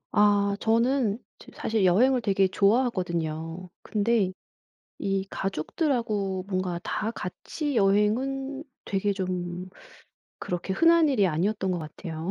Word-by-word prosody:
아 205 -1 +4
저는 230 -1 +2 0.2
좀 - - -15
사실 220 -3 0
여행을 245 +8 +4
되게 195 -3 +2
좋아하거든요. 180 -6 0
근데 210 -2 +1 0.7
이 195 -1 -1
가족들하고 195 - -1
뭔가 185 -3 -2
다 215 +3 -2
같이 260 - -4
여행은 260 +8 +1 0.2
되게 200 +1 0
좀 180 -1 -4 0.7
그렇게 180 +2 -3
흔한 330 - +5
일이 210 -8 +3
아니었던 190 +4 0
것 180 - -1
같아요. 160 +1 -6
200 Hz, 250 characters per minute, -27 LUFS, 185-230 Hz, 0.7 s, 흔한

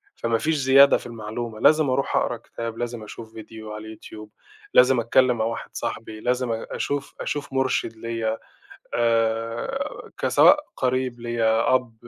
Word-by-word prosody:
فما 115 -1 0
فيش 155 +6 0
زيادة 140 0 +6
في - - -12
المعلومة، 115 0 -6
لازم 155 -2 +4
أروح 130 +2 0
أقرا - - +1
كتاب، 115 -1 -7
لازم 120 -2 -4
أشوف 110 +1 -10
فيديو 110 0 -10
على 105 0 -7
اليوتيوب، 110 -1 -11 0.4
لازم 125 0 +6
أتكلم 125 +1 +3
مع 110 - 0
واحد 115 0 -4
صاحبي، 110 -2 -5
لازم 125 +1 0
أ 115 0 -3
أشوف، 145 -1 -3
أشوف 145 -2 -4
مرشِد 130 -4 0
ليّا 115 -1 -2 0.6
آآ، 115 - -1
كسواء 295 +1 +5 0.2
قريب 130 -1 -1
ليّا، 115 0 +2
أب، 125 -3 -1
115 Hz, 150 wpm, -24 LUFS, 110-130 Hz, 0.6 s, زيادة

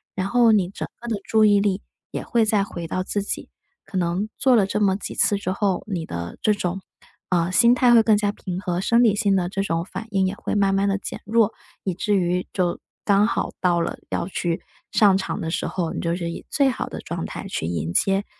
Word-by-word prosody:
然 190 0 -1
后 240 +1 +4
你 195 -5 +3
整 195 - -5
个 240 - -9
的 230 - 0
注 220 -1 +3
意 205 -1 +5
力 200 -1 0 0.3
也 - - -4
会 235 -2 +2
再 210 -2 +2
回 170 -4 -6
到 185 +3 -2
自 205 +2 -2
己， - - -4 0.4
可 - - -11
能 180 +3 0
做 260 -2 +5
了 200 - +4
这 210 +2 -1
么 195 -2 +3
几 - - -6
次 205 - +3
之 190 -2 -3
后， 195 -2 0
你 185 -6 -3
的 85 - -6
这 215 - +3
种， 190 -1 -3 0.5
呃， 175 -1 +2
心 235 +5 +6
态 245 -1 +5
会 230 - +8
更 220 -1 +4
加 205 -1 +1
平 185 -3 -5
和， 180 -2 -2
生 235 +4 +3
理 215 -4 +4
性 205 -1 +2
的 180 -2 +1
这 195 +1 -2
种 165 -2 -1
反 225 - -7
应 195 -3 +1
也 185 - -1
会 - - -3
慢 195 -1 +3
慢 200 +1 +2
地 195 - +1
减 - - -7
弱。 225 0 +3 0.3
以 190 - -1
至 205 +4 0
于 180 -1 0
就 180 -3 -1 0.3
刚 205 +1 +4
好 - - -1
到 175 -1 +3
了 170 - -2
要 - - -2
去 175 -3 -2 0.3
上 200 -3 +5
场 190 - -2
的 160 - -3
时 - - -1
候， 175 -3 -2
你 - - -3
就 170 0 0
是 170 -1 -3
以 - - -7
最 280 -2 +3
好 250 - -3
的 - - -7
状 - - -5
态 - - -7
去 80 - -3
迎 85 -1 -2
接， 195 - +2
195 Hz, 260 characters per minute, -23 LUFS, 180-210 Hz, 0.5 s, 会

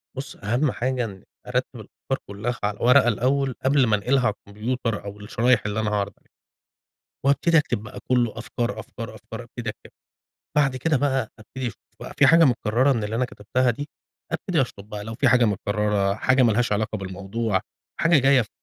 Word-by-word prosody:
بُصّ، 135 0 -6
أهم 120 +8 0
حاجة 125 0 -1
إني 95 -4 -10 0.2
أرتّب - - 0
الأفكار - - -5
كلّها 110 +4 -4
على 105 0 -1
ورقة 125 +1 +6
الأول 130 +3 +1
قبل 135 -1 +4
ما 110 - +4
أنقلها 125 +5 +1
على 105 - +2
الكمبيوتر 110 +2 -3
أو 100 +1 -7
الشرايح 120 +2 +2
اللي 105 +1 -1
أنا 110 -1 0
هاعرض 100 -1 -1
عليها، - - -36 1.0
وابتدي 165 +4 +4
أكتب 140 -8 0
بقى 110 - -9
كلّه 120 -3 +1
أفكار، 115 +1 -3
أفكار، - - -8
أفكار - - -9
أبتدي - - -5
أكتب، - - -15 0.7
بعد 135 -3 +3
كده 150 +3 +1
بقى 130 -4 0
أبتدي 130 +4 -5
أشوف 115 - -6 0.2
بقى - - -8
في 145 - +6
حاجة 165 +3 +7
مُكرّرة 125 +1 +2
من 115 -4 -2
اللي 105 +2 -3
أنا 125 +2 +1
كتبتها 125 +3 0
دي، 145 +6 -6 0.4
أبتدي 160 0 0
أشطب 105 -5 -5
بقى 105 -1 -5
لو 110 +1 -6
في - - +2
حاجة 125 -2 +5
متكرّرة، 100 -1 0
حاجة 130 +4 +3
مالهاش 120 0 +2
علاقة 110 +1 0
بالموضوع، 100 +2 -2 0.4
حاجة 165 -1 +5
جاية 135 0 +5
في 110 - -7
120 Hz, 185 wpm, -24 LUFS, 105-130 Hz, 1.0 s, حاجة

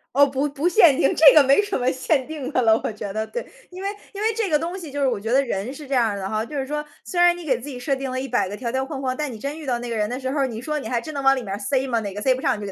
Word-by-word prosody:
哦， 285 +1 +7
不 275 +1 -1
不 290 +4 -1
限 340 -6 +6
定， 275 - +2
这 315 - +8
个 300 - +8
没 275 +8 +5
什 405 -1 -2
么 255 0 +1
限 260 +1 0
定 295 -3 -6
的 255 - +3
了， 225 -1 +4
我 - - 0
觉 210 -1 -6
得， 220 +2 -3
对。 485 - -5 0.2
因 370 +1 -9
为 395 - -1 0.2
因 400 - -6
为 445 +1 +1
这 440 -4 -1
个 300 - +4
东 340 +5 -4
西 330 -5 -8
就 285 +1 -4
是 275 - +3
我 235 -5 -2
觉 220 +3 -5
得 265 +3 +4
人 235 0 -3
是 290 +1 -10
这 275 - -5
样 230 -5 +2
的 195 -1 -5
哈， 215 +1 -1
就 295 - -9
是 270 - -1
说， 300 +2 -3 0.2
虽 355 - -3
然 350 0 +5
你 350 - -9
给 260 -5 +1
自 255 - -10
己 265 - -6
设 260 +3 -1
定 270 0 -4
了 255 0 -3
100 250 -6 0
个 200 - -6
条 235 +1 -4
条 265 +1 -1
框 270 -1 -6
框， 255 -1 -1
但 300 -3 -2
你 225 - -8
真 280 +7 -5
遇 310 - -9
到 250 -3 0
那 240 0 -6
个 230 - -2
人 210 0 0
的 250 - -3
时 260 -1 -3
候 290 - -1
儿， 270 - +2
你 230 -2 -6
说 300 +3 -2
你 - - -6
还 240 -2 -1
真 310 +5 -8
能 280 - -3
往 270 0 +5
里 255 - -4
面 195 -3 -5
儿 205 - -4
塞 265 +2 0
吗？ 235 -3 0
哪 200 -3 -5
个 205 - -6
塞 260 +3 +3
不 255 - -5
上 - - +1
你 210 - -8
就 200 -1 -5
265 Hz, 400 characters per minute, -23 LUFS, 235-300 Hz, 0.2 s, 这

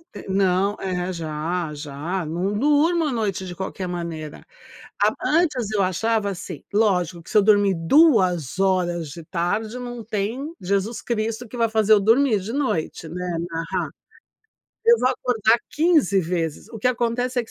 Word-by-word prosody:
é, - - -8
não 195 +1 +2
é, 185 -1 -2
já, 165 0 -3
já, 150 +5 -4
não 175 +6 -2
durmo 300 +6 +3
à 295 - 0
noite 205 -6 -2
de 180 - -6
qualquer 190 0 -5
maneira. 165 -3 -6 0.6
Ap - - +3
antes 295 - +1
eu 205 -2 +1
achava 205 +3 0
assim 180 -4 -7
lógico 180 -5 +1
que - - -14
se - - +2
eu - - +7
dormir 205 -1 +4
2 185 - +3
horas 175 -4 +1
de 165 +2 -9
tarde, 210 +9 -2
não 245 -2 -6
tem 225 +9 -3
Jesus 200 +5 -1
Cristo 230 +1 -2
que 235 - -10
vai 230 -1 +1
fazer 220 -1 +4
eu 205 - +5
dormir 225 0 +3
de 210 +5 -5
noite, 240 - -2
né, 180 0 -4
narra. 165 0 -3 1.0
Eu 470 0 +6
vou 255 - +2
acordar 240 -3 +2
15 300 - +3
vezes. 165 +2 -3
O 225 - -9
que 215 - -1
acontece 245 +1 -1
é 240 - 0
que - - -18
200 Hz, 170 wpm, -23 LUFS, 175-235 Hz, 1.0 s, eu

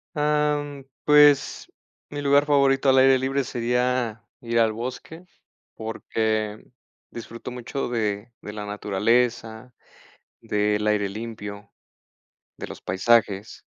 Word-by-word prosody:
Ah, 150 0 +1
mm, 145 -1 -9 0.2
pues 145 -1 +4 0.4
mi 145 0 -5
lugar 140 0 +4
favorito 140 -2 +3
al 130 - +5
aire 130 0 +6
libre 135 +1 -1
sería 125 -1 -1 0.2
ir 115 -1 0
al 110 -1 +3
bosque 130 +8 -7 0.5
porque 110 -1 -3 0.5
disfruto 115 +1 -8
mucho 125 +2 -4
de 110 -2 -2
de 105 - -7
la 105 0 -6
naturaleza, 110 +3 -1 0.7
del 105 0 0
aire 105 -2 +1
limpio, 105 -1 -7 0.9
de - - -6
los - - -10
paisajes. 105 0 +1
115 Hz, 115 wpm, -24 LUFS, 105-135 Hz, 0.9 s, aire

